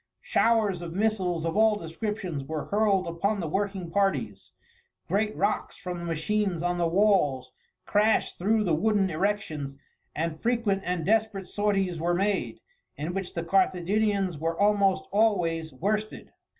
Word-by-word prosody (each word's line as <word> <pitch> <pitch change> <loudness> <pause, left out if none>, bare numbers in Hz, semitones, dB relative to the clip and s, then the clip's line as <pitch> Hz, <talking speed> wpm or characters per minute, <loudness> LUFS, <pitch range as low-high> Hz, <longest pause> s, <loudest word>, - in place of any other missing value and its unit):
Showers 215 -6 +2
of 170 -1 -6
missiles 190 -6 0
of 165 - -2
all 220 0 +4
descriptions 185 -3 -4
were 155 +2 -4
hurled 205 -2 +2
upon 195 +5 -1
the 170 - -2
working 195 0 -2
parties, 195 0 -1 0.6
great 210 +2 0
rocks 205 +2 -1
from 180 -1 -5
the 170 - -6
machines 175 +2 -1
on 175 0 0
the 170 - +2
walls 165 -9 +2 0.3
crashed 210 +2 +2
through 215 +4 +2
the 175 -5 +1
wooden 195 +3 +2
erections, 155 -6 -2 0.4
and 160 0 -3
frequent 230 -5 +1
and 175 -2 -2
desperate 215 -2 +1
sorties 195 -5 -1
were 175 +1 +1
made, 195 +1 -1 0.4
in 155 +4 -3
which 190 -1 -4
the 170 - -2
Carthaginians 190 0 +1
were 165 +1 -2
almost 200 -2 +3
always 175 -7 +1
worsted. 210 +10 -3
195 Hz, 145 wpm, -27 LUFS, 170-210 Hz, 0.6 s, all